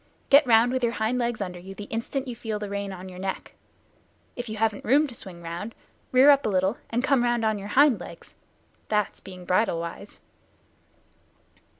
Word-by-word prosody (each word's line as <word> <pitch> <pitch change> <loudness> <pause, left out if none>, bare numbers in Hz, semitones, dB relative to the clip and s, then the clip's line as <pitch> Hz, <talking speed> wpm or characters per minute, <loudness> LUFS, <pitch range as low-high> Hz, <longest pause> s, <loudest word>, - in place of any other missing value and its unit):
Get 280 0 +7
round 230 +1 +5
with 260 0 -1
your 235 -1 +1
hind 225 +3 0
legs 235 -2 -1
under 180 -2 -7
you 190 +2 -10
the 205 - -7
instant 235 +6 -4
you 245 - -5
feel 225 -2 -4
the 210 -1 -6
rein 200 -1 -3
on 185 0 -8
your 180 -1 -10
neck. 190 0 -5 0.8
If 245 -1 -6
you 220 - -5
haven't 220 -1 0
room 285 +6 +4
to 270 - -8
swing 180 -6 -9
round, 175 +7 -6 0.4
rear 260 +3 +7
up 280 0 +4
a - - 0
little 190 +2 +1
and 240 +2 -1
come 270 -2 +3
round 240 -1 +1
on 215 -1 +1
your 200 - -7
hind 280 -7 +6
legs. 170 -1 -11 0.6
That's 210 -2 0
being 185 -2 -11
bridle 185 -1 +1
wise." 170 +4 -8
220 Hz, 200 wpm, -26 LUFS, 190-245 Hz, 0.8 s, Get